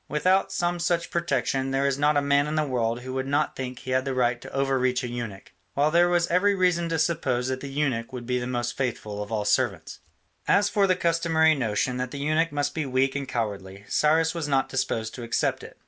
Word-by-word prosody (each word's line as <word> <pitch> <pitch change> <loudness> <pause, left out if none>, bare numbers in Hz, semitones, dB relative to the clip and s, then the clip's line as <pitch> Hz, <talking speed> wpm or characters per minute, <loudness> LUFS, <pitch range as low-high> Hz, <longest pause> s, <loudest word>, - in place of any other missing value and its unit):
Without 185 +7 +2
some 175 0 -1
such 170 -1 0
protection 135 -5 0
there 135 +1 0
is 140 0 0
not 145 0 +3
a 145 - +2
man 140 +1 +3
in 150 - -2
the 155 -1 +1
world 120 -3 -1
who 130 +1 -6
would 130 0 -2
not 145 +2 0
think 130 -1 -5
he 130 - -7
had 130 0 +2
the 135 -1 -3
right 120 -1 +1
to - - -10
over 135 -1 0
reach 125 0 +1
a - - -2
eunuch: 120 -5 -6 0.2
while 145 +2 +2
there 175 +1 +4
was 175 -1 +2
every 200 +4 +2
reason 180 -3 +1
to 165 - 0
suppose 145 -6 0
that 130 0 -2
the 140 - -7
eunuch 135 -5 -1
would 125 -2 -7
be 125 +1 0
the 120 - -4
most 120 -1 -2
faithful 110 -5 -3
of 105 +1 -7
all 105 -2 -1
servants. - - 0 0.5
As 205 0 +4
for 205 -2 +3
the 185 - +3
customary 165 -2 +2
notion 125 -1 -1
that 125 0 -2
the 140 - -7
eunuch 155 +3 +1
must 145 0 -1
be 155 -3 -2
weak 130 +1 +1
and 140 -1 -3
cowardly, 100 -5 -4
Cyrus 160 +2 +2
was 165 -3 -3
not 135 -2 +1
disposed 115 -4 -2
to 125 - -8
accept 115 0 0
it. - - -12
135 Hz, 240 wpm, -25 LUFS, 125-160 Hz, 0.5 s, there